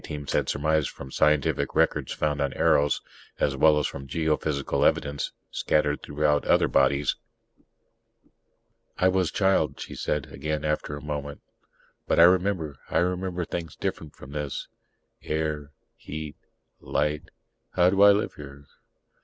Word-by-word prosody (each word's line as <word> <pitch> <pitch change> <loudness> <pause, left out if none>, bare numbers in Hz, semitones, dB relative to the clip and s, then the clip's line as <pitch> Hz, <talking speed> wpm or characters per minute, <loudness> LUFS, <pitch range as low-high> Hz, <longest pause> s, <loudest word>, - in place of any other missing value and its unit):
Teams 75 -1 -5
had - - +1
surmised 75 +1 +1
from 65 -1 -10
scientific 75 0 +1
records - - +1
found 75 -1 -1
on 70 - 0
Eros, 70 0 +2 0.4
as - - +1
well 80 -1 +5
as 75 - +1
from 70 0 -5
geophysical 75 -1 0
evidence 70 -1 +1 0.2
scattered 75 -1 +1
throughout 75 0 +1
the - - -9
other - - +4
bodies.) 70 0 +2 1.8
"I 95 - +4
was 95 -2 +1
child," 95 -1 +1
she - - -7
said 75 -3 -2
again 75 0 -3
after 75 -1 -2
a 75 - -11
moment. 75 -1 -5 0.7
"But - - +2
I - - +9
remember 90 -5 +3
I - - 0
remember 90 0 -1
things 85 -2 -5
different 75 -2 -4
from 65 - -12
this. 75 -2 -4 0.5
Air... 75 -2 -2 0.3
heat... 75 0 -7 0.4
light... 75 0 -2 0.4
how 90 0 +4
do 100 0 +2
I 100 0 +9
live 100 +1 0
here?" 70 -1 -11
75 Hz, 145 wpm, -26 LUFS, 70-85 Hz, 1.8 s, I